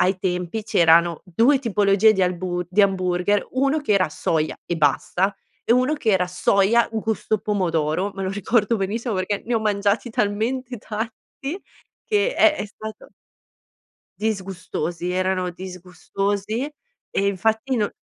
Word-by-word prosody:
Ai 185 +1 +2
tempi, 180 +3 -2
c'erano 170 -5 +4
2 230 - +3
tipologie 210 -2 +4
di 190 - -1
albu 180 0 -1
di 205 +3 +3
hamburger, 185 +1 +1
uno 275 +4 +2
che 285 -8 0
era 185 -4 +3
soia 155 0 -1
e 175 - -2
basta, 180 +6 +1 0.3
e - - +3
uno 255 +5 +3
che 260 -7 0
era 185 -3 +2
soia 200 +5 +3
un 220 - -1
gusto 220 0 -1
pomodoro, 180 -3 0
me 195 - -5
lo 190 - -1
ricordo 210 +3 +1
benissimo, 220 +4 -2
perché 190 +2 -2
ne 240 - 0
ho 225 - +2
mangiati 205 +2 0
talmente 230 +5 -1
tanti 225 - -6 0.4
che 425 +3 +1
è 310 -2 +5
è - - -4
stato 215 +1 -10 1.1
Disgustosi, 185 -4 -3
erano 185 0 0
disgustosi. 195 - -4 0.4
E 200 - +1
infatti 220 +6 0
no 210 -3 0
200 Hz, 145 wpm, -22 LUFS, 185-225 Hz, 1.1 s, è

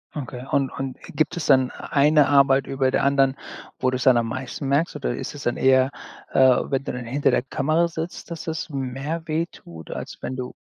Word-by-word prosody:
Okay. 130 -3 -6
Und 135 -2 +1
und 135 -2 -5 0.2
gibt 155 - +1
es 175 - -3
dann 130 -2 +5
e - - -12 0.2
eine 150 0 +5
Arbeit 140 -1 +4
über 135 -1 0
der - - +1
anderen, 135 -1 +3 0.4
wo 130 - +2
du 130 - -1
es - - -3
dann 130 -2 +6
am 115 -1 +1
meisten 130 +2 -5
merkst 145 +5 +1
oder 135 -4 -2
ist - - -6
es 140 - -8
dann 120 - -1
eher, 130 0 +4 0.4
äh, - - +1
wenn 130 +1 +3
du - - -3
dann 125 -1 -5
hinter 140 +5 +1
der - - +2
Kamera 155 +5 +1
sitzt, 165 +1 -6
dass 170 - -6
es 160 +1 -3
mehr 140 +4 -4
wehtut, 155 - -5
als - - -6
wenn 130 - -4
du 125 -1 -5
135 Hz, 220 wpm, -23 LUFS, 130-150 Hz, 0.4 s, dann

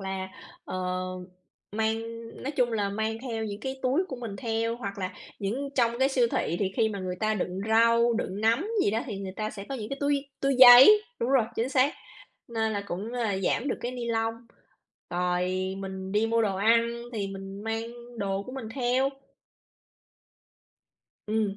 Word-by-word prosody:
là, 190 -1 -4 0.4
ờ, 185 0 -2 0.7
mang 220 +1 0 0.4
nói 270 - -2
chung 245 -3 +1
là 205 -3 0
mang 220 +2 -2
theo 225 -4 -3
những 205 -1 -5
cái 265 +3 -4
túi 275 +9 +2
của 260 - -5
mình 230 -5 -6
theo, 230 -1 -1
hoặc 200 -4 -6
là 185 -1 -3 0.3
những 245 +8 -2
trong 235 -1 +2
cái 265 +1 +4
siêu 255 -3 +3
thị 170 - 0
thì 190 -2 0
khi 220 - +3
mà 205 -2 -5
người 180 -1 -4
ta 215 0 +1
đựng 185 -1 -3
rau, 230 +1 +4
đựng 205 -3 -3
nấm 230 - +2 0.2
gì - - +2
đó 225 - 0
thì 205 -5 -5
người 190 -1 -5
ta 215 -1 -2
sẽ 200 -2 -8
có 275 - -3
những 215 -4 -5
cái 275 - -4
túi 285 -1 +1 0.2
túi 275 0 +2
giấy 260 +12 +10 0.2
đúng 240 - 0
rồi, 265 -4 +4
chính 235 +3 0
xác, 270 +1 +3 0.5
nên 220 -1 -1
là 205 -1 -2
cũng 190 +4 -4
là 225 -6 -1
giảm 230 +7 0
được - - -2
cái 245 +1 -3
nylon, 225 -2 -1 0.8
rồi 180 +1 0
mình 190 0 -6
đi 215 +2 +2
mua 230 0 +2
đồ 195 -3 0
ăn 230 +3 +2
thì 205 -3 -2
mình 195 +1 -8
mang 225 +1 -2 0.3
đồ 195 0 -1
của 255 - -9
mình 260 -5 -6
theo. 260 +1 +2 2.2
Ừm, 210 -2 0
225 Hz, 190 wpm, -27 LUFS, 195-245 Hz, 2.2 s, giấy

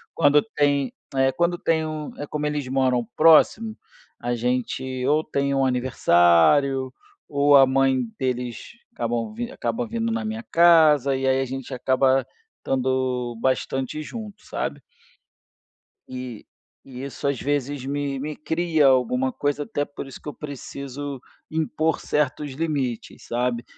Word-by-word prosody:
quando 145 -2 +5
tem, 140 -3 +1 0.2
é, 135 0 +2
quando 175 0 +1
tem 160 -2 0
um 155 -1 -5
é 145 - -5
como 150 +1 -3
eles 150 -2 -2
moram 130 -3 +1
próximo, 210 +8 +5 0.4
a 120 +1 -2
gente 125 +2 -2
ou 150 +1 +3
tem 140 -3 -1
um 135 -1 +2
aniversário 130 - +3 0.3
ou 145 0 +5
a 135 - +8
mãe 130 -1 +2
deles 125 -2 -3 0.2
acabam 120 - -2
v 240 +2 -5
acabam 245 -2 -2
vindo 230 0 -2
na 230 0 -2
minha 220 +1 -4
casa 155 -5 +5
e 135 0 -1
aí 130 0 +3
a - - -1
gente 135 +1 -6
acaba 130 +1 +2 0.4
tando 130 -2 -1
bastante 130 +2 -1
junto, 210 +5 -8
sabe? - - -4 1.3
E 125 -3 -7 0.4
e 130 -1 -9
isso 140 +1 -4
às 140 -3 0
vezes 145 -1 -2
me 140 0 -2
me 150 +2 -4
cria 160 -2 +1
alguma 130 0 +2
coisa, 145 0 -1
até 145 0 -2
por 145 - -8
isso 135 - -10
que - - -14
eu 150 - -4
preciso 140 -1 -7 0.3
impor 160 0 0
certos 150 0 -1
limites, 140 -6 -3
sabe? 120 0 -1
140 Hz, 145 wpm, -24 LUFS, 130-150 Hz, 1.3 s, a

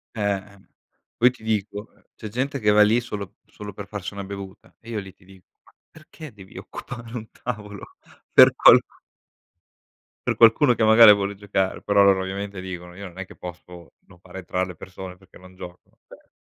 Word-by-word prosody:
Eh, 110 - -4
ehm, 100 -1 -4 0.5
poi 125 - +5
ti 125 - -18
dico 105 -1 -3 0.3
c'è 110 - -8
gente 135 +5 -3
che 105 -3 +2
va 105 0 +5
lì 110 +3 +4
solo 105 -5 -7
solo 105 -1 -10
per 100 0 -9
farsi 100 -2 -6
una 100 0 -6
bevuta 100 -1 -10
e 115 - -15
io 115 -2 -3
lì 95 -2 -10
ti - - -27
dico: 95 -1 -18 0.2
"Ma - - -24 0.2
perché 155 -3 -13
devi 95 -2 -14
occupare 115 -1 -9
un 110 -2 -7
tavolo 105 -4 -8 0.4
per - - +8
qual" - - +8 1.5
"per - - 0
qualcuno 120 +4 +5
che 115 - 0
magari 110 0 +8
vuole 100 0 -2
giocare." 95 -1 -2
Però 100 0 +3
loro 95 -1 +4
ovviamente 100 +1 -5
dicono: 90 -1 -8
"Io 100 +1 -8
non 90 0 -15
è 95 - -5
che - - -15
posso 90 -1 -11
non 90 - -19
fare 95 +1 -11
entrar 95 0 -3
le 90 - -9
persone 90 +2 -10
perché 95 -1 -19
non 95 0 -17
giocano." 90 -1 -13
Cioè - - -18
100 Hz, 195 wpm, -23 LUFS, 95-110 Hz, 1.5 s, per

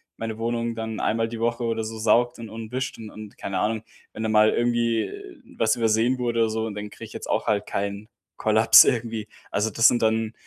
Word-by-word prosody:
meine 110 -1 -5
Wohnung 115 0 -2
dann 110 -1 -5
einmal 115 +1 0
die 115 0 -7
Woche 120 +1 0
oder 115 -1 -1
so 110 +1 -6
saugt 120 +3 +2
und 115 -1 -8
und 110 0 -8
wischt 130 +2 -3
und 110 -2 -9
und 105 -1 -11
keine 100 -1 -3
Ahnung. 110 +2 -1 0.3
Wenn 110 - -5
da 110 - -1
mal 110 0 +5
irgendwie 120 -1 0 0.5
was 110 0 +2
übersehen 115 +2 +2
wurde 120 -1 -1
oder 115 - +2
so 110 0 -2
und 105 - -6
dann 105 0 -6
kriege - - -10
ich - - -14
jetzt - - -7
auch - - 0
halt 105 -1 +1
keinen 100 +1 -4 0.3
Kollaps 110 +1 +7
irgendwie. 115 -2 -1 0.2
Also, 110 +2 0
das 115 +2 +5
sind 120 - +2
dann 110 0 +1
110 Hz, 225 wpm, -24 LUFS, 110-115 Hz, 0.5 s, Kollaps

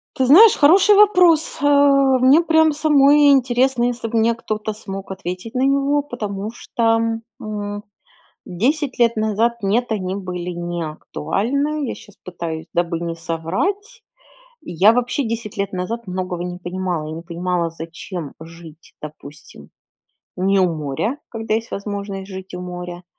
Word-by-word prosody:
Ты 260 - +1
знаешь, 410 - +8
хороший 380 +8 +5
вопрос, 365 -6 +4
э, - - 0
мне 275 0 +5
прям 320 -1 +3
самой 290 -1 +5
интересно, 255 -1 +2
если 245 -1 -1
бы 230 - -2
мне 225 +1 +3
кто-то 215 -2 -4
смог 195 -2 -8
ответить 185 +3 -6
на 255 - -1
него, 280 +1 +2
потому 210 -7 -5
что, 225 -1 0 0.4
м, 205 -1 -5 0.6
10 270 - -1
лет 235 -1 +3
назад, 220 +2 0
нет, 230 +5 0
они 190 -4 -2
были 180 -2 -5
не 175 0 -4
актуальны, 260 - -2
я - - -3
щас 205 -1 -16
пытаюсь, 165 -3 -6
дабы 170 -1 -1
не 170 -1 -3
соврать, 195 - -3 0.6
я 185 +5 +3
вообще 245 +3 -1
10 225 -3 -5
лет 200 0 -2
назад 225 +6 -4
многого 180 -2 -4
не 180 0 -6
понимала, 175 -3 -3
я - - -6
не 165 - -8
понимала, 175 0 -2
зачем 165 -1 -8
жить, 165 0 -14
допустим, 150 -1 -12 0.7
не 195 +2 +2
у 180 -3 +2
моря, 155 - -3
когда 225 -2 -3
есть 225 +1 -4
возможность 200 -1 -5
жить 190 0 -9
у 180 - -6
моря, 180 0 -7
210 Hz, 150 wpm, -20 LUFS, 180-265 Hz, 0.7 s, знаешь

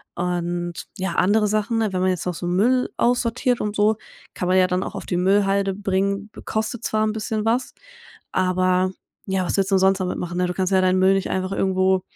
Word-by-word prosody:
Und, 175 0 -2 0.2
ja, 190 -2 -2
andere 210 +3 +3
Sachen, 215 +2 0
ne? 215 -3 0
Wenn 185 - 0
man 185 - +2
jetzt 180 -2 -3
noch 180 - -1
so 175 - -5
'n 175 - 0
Müll 250 +6 +2
aussortiert 245 +1 +1
und 210 0 -3
so, 210 +1 +3 0.4
kann 180 - -3
man 185 - +4
ja 185 0 +5
dann 180 0 -1
auch - - -6
auf - - -6
die 180 - -2
Müllhalde 195 +1 +2
bringen. 200 +1 -1 0.2
Kostet 220 +2 -3
zwar 215 0 0
'n 215 - -1
bisschen 215 0 -3
was, 240 +3 0 0.6
aber 185 0 +1 0.3
ja, 190 -1 0
was - - -1
willst 195 0 0
'n 190 - +5
sonst 190 0 +3
damit 185 -1 -2
machen, 175 0 -4
ne? 180 - +2
Du 180 - -3
kannst 190 +1 -1
ja 190 - +4
deinen 185 0 +2
Müll 190 +1 +5
nicht 195 0 -1
einfach 185 0 -1
irgendwo, 190 -1 +1
190 Hz, 225 wpm, -22 LUFS, 185-210 Hz, 0.6 s, ja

